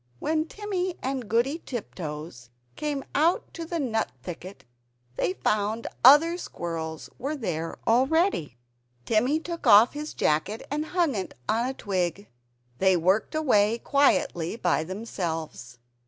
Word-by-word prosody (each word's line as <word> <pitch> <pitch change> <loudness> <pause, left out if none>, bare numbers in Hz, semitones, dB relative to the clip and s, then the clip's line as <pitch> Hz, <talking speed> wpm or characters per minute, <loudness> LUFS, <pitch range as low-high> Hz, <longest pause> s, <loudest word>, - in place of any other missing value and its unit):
When 310 - 0
Timmy 375 -2 -3
and 260 -4 -3
Goody 245 +8 +1
Tiptoes 150 - -6 0.3
came 290 -2 -3
to 330 +2 +1
the 335 0 -2
nut 225 -6 -1
thicket, 180 +5 -8 0.5
they 180 - 0
found 215 +3 -1 0.2
other 315 +7 +7
squirrels 160 - -5
were 280 +5 -2
there 165 - -3
already. 255 - +2 0.5
Timmy 245 +8 +2
took 335 +1 -5
off 210 +4 +8
his 300 +1 -6
jacket 160 +9 0
and 300 +1 -1
hung 335 -6 +3
it 195 -4 -4
on 230 +3 +1
a 265 - -4
twig; 190 -1 -2 0.5
they 190 -1 +4
worked 190 - +1
away 230 -8 +3
quietly 235 - +1
by 175 -8 +1
themselves. 165 - -5
225 Hz, 125 wpm, -26 LUFS, 175-295 Hz, 0.5 s, off